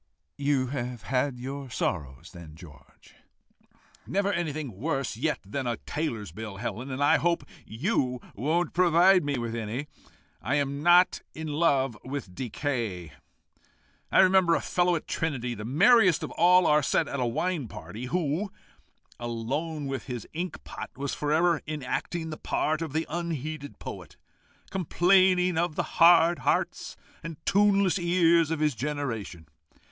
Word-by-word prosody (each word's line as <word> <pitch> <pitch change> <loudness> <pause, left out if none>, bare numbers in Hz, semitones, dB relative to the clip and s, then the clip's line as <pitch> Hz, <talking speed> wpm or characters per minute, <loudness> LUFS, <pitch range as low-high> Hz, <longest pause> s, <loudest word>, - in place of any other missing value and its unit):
"You 140 -2 +1
have 125 -4 -4
had 125 +4 -1
your 135 +2 -6
sorrows, 70 - -3
then, 85 -3 -11
George?" 75 -6 -16 0.9
"Never 200 +1 0
anything 155 - -3
worse 135 -4 -2
yet 150 +7 -1
than 125 +6 -4
a 120 -2 -1
tailor's 120 - -4
bill, 105 +1 -7
Helen, 120 +4 -5
and 130 +2 -2
I 150 +2 +5
hope 170 +2 0 0.2
you 125 - -1
won't 160 - 0
provide 180 +1 +5
me 145 -2 -1
with 120 -1 -3
any. 115 +4 -4 0.6
I 130 - 0
am 140 0 -1
not 175 +2 +5
in 160 0 -5
love 140 -5 +2
with 130 -8 -6
decay. 115 - -3 1.0
I - - +6
remember 185 -3 +5
a - - +1
fellow 175 0 +1
at 160 - -4
Trinity, 130 -7 -2
the 105 -2 -7
merriest 185 - +5
of - - -5
all 180 +1 +5
our 150 0 +4
set 155 +2 +1
at 140 - -4
a 125 - +1
wine 160 +3 -1
party, 105 +3 -8
who, 170 +6 -1 0.7
alone 135 +7 -3
with 135 -1 -4
his 125 -4 -6
ink 175 +3 -5
pot, - - -7
was 140 +1 -3
for 150 0 -2
ever 165 +1 +3
enacting 155 +3 -3
the 155 - -6
part 155 +1 -1
of 160 -4 -4
the 160 +1 0
unheeded 155 -3 -4
poet, - - -9 0.5
complaining 180 -1 +3
of 170 -2 -1
the - - 0 0.2
hard 170 0 +7
hearts - - -1 0.2
and 165 -1 -7
tuneless 200 -2 +3
ears 170 -2 +3
of 160 -2 -2
his 150 -2 +2
generation. 120 - -4
145 Hz, 150 wpm, -27 LUFS, 125-170 Hz, 1.0 s, hard